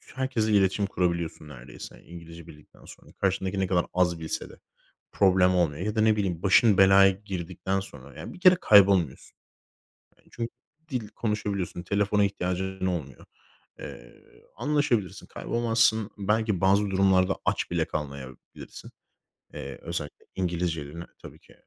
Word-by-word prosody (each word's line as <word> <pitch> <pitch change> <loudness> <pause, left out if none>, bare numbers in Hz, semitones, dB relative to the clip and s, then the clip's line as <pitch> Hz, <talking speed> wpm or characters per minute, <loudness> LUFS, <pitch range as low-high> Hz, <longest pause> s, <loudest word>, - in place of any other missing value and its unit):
Herkesle 125 -5 -1
iletişim 100 0 +2
kurabiliyorsun 85 -5 -2
neredeyse 65 -3 -11
İngilizce 85 -1 -12
bildikten 75 -2 -17
sonra. - - -15
Karşındaki 95 0 -1
ne 95 - +1
kadar 90 -2 +1
az 85 -2 +1
bilse 80 - -5
de - - -15 0.5
problem 95 -2 +3
olmuyor. 85 -3 0
Ya 105 - -2
da 110 - +2
ne 110 0 +4
bileyim, 95 -5 -2
başın 105 +1 +5
belaya 95 0 +7
girdikten 95 -1 -4
sonra, 70 -8 -11
ya - - -8
bir - - -13
kere 185 0 +7
kaybolmuyorsun. 95 - +4 0.8
Yani, - - -27
çün 115 0 -4 0.4
dil 125 -6 -3
konuşabiliyorsun, 100 -6 -3
telefona 105 +2 +1
ihtiyacın 95 -1 -3
olmuyor. 75 -8 -5 0.5
Eee, - - -11 0.3
anlaşabilirsin, 120 - -1
kaybolmazsın. 115 -2 0
Belki 105 -1 0
bazı 100 +1 +3
durumlarda 95 -1 +3
aç - - -1
bile 85 -2 +1
kalmayabilirsin. 70 -3 -8 0.6
Eee, 70 0 -7
özellikle 80 -3 -6
İngilizcelerini 85 -3 -3 0.2
tabii - - -12
ki, - - -21
95 Hz, 135 wpm, -26 LUFS, 85-105 Hz, 0.8 s, belaya